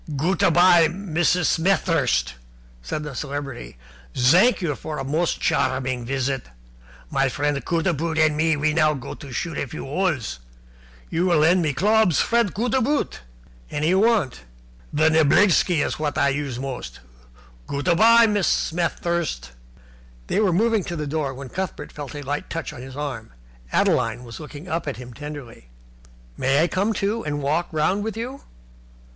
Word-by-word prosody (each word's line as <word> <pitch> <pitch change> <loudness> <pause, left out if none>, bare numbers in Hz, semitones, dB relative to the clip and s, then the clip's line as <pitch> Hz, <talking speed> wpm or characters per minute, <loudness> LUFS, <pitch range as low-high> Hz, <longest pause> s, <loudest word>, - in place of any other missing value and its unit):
"Goot 165 +6 0
a - - +5
bye, 175 0 +6
Mrs. 175 -1 0
Smet 190 +4 +2
thirst," 65 - +1 0.5
said - - -4
the 150 -2 -6
Celebrity. 135 - -6 0.4
"Zank 180 - +5
you 170 -6 -1
for 155 +2 -6
a 135 - -3
most 155 +5 -1
charming 130 -7 0
visit. 135 +1 -2 0.6
My 135 0 +2
friend 145 +2 -1
Cootaboot 165 -1 -1
and 155 -1 +3
me 160 +1 +2
we 150 +1 0
go 155 -1 +3
now 130 - -7
to 140 -3 -11
shoot 165 +4 -3
a - - -2
few - - -7
holes. 140 - -1 0.7
You 175 +3 +1
will 175 -3 +3
lend 170 +4 +4
me 155 -3 0
clobs, 210 -1 +3
friend 235 -4 +2
Cootaboot?" 250 +6 0 0.5
"Any 150 +2 -1
you 190 +1 +3
want." 215 - +2 0.5
"The 155 +2 +3
niblicksky 160 +2 +4
is - - -4
what 150 -1 -2
I 140 - +3
use 140 -3 -3
most. 130 -1 -6 0.7
Goot 140 +4 -4
a 175 - +5
bye, 230 +4 +7
Mrs. 205 -4 +1 0.3
Smet 170 +1 -1
thirst." 170 - -2 0.7
They - - 0
were 205 -4 +3
moving 220 +3 +2
to 175 - -4
the 150 -2 -3
door, 145 -1 -2
when 135 0 -8
Cuthbert 190 +5 -5
felt 145 -2 -8
a 145 - -6
light 145 +2 -4
touch 165 -2 -4
on 120 - -9
his 130 +1 -9
arm. 140 - -5 0.4
Adeline 115 +2 +1
was 120 +3 -9
looking 150 +2 -10
up 165 -2 -3
at 140 - -3
him 125 0 -10
tenderly. 140 - -9 0.7
"May 135 +4 +2
I - - +2
come, 195 +5 0
too, 215 +3 -1
and 145 -1 -3
walk 155 +5 0
round 180 +6 +1
with 220 0 -4
you?" 255 +4 -5
155 Hz, 170 wpm, -23 LUFS, 140-180 Hz, 0.7 s, bye